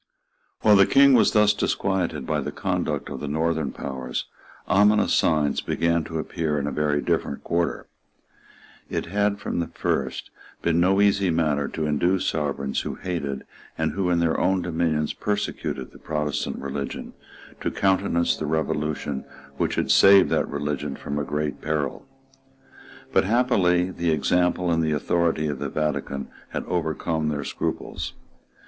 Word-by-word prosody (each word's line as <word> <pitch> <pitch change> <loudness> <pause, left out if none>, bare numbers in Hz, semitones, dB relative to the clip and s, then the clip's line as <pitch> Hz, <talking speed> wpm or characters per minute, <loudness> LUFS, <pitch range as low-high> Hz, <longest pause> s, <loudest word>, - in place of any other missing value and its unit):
While 105 -1 +6
the 100 0 +6
King 140 +4 +6
was 120 - +5
thus 105 -1 +5
disquieted 95 -7 -1
by - - 0
the - - -4
conduct - - -2
of - - -5
the 75 - -5
Northern 80 -1 0
powers, 65 -2 -4 0.4
ominous 105 +2 +4
signs 75 -2 +2
began 85 0 0
to 80 - -4
appear 80 -1 -2
in 70 - -1
a 75 - -2
very 75 0 0
different 70 - -1
quarter. 85 0 -1 1.0
It - - -2
had, 100 +3 0
from 100 - -3
the 85 - -1
first, - - -2 0.3
been 85 0 +2
no 95 +3 +4
easy 100 -2 +3
matter 75 -4 +1
to 80 - -3
induce 85 +5 +1
sovereigns 70 -3 -1
who - - -4
hated, 70 -7 -4 0.3
and 80 0 0
who, 95 -2 -1
in 85 - +2
their 85 -1 +1
own 95 -1 +2
dominions, 80 -3 0
persecuted, 75 -10 -3
the - - -15
Protestant 75 -2 -2
religion, 70 0 -5 0.5
to - - -1
countenance 95 -3 +1
the 75 - -4
revolution 75 -3 -2 0.3
which - - 0
had - - 0
saved 100 -1 +7
that - - +1
religion 75 -1 -3
from 70 +1 -4
a - - -1
great 75 +1 -3
peril. 75 -3 -2 1.1
But - - +4
happily 95 -6 +2
the 85 -2 -1
example 90 +4 +2
and 80 0 +2
the 80 -1 +1
authority 80 +1 +1
of 75 - -3
the - - -3
Vatican 75 -3 -2 0.2
had - - -4
overcome 80 -2 -1
their 75 -1 -2
scruples. - - -4
80 Hz, 155 wpm, -24 LUFS, 75-90 Hz, 1.1 s, saved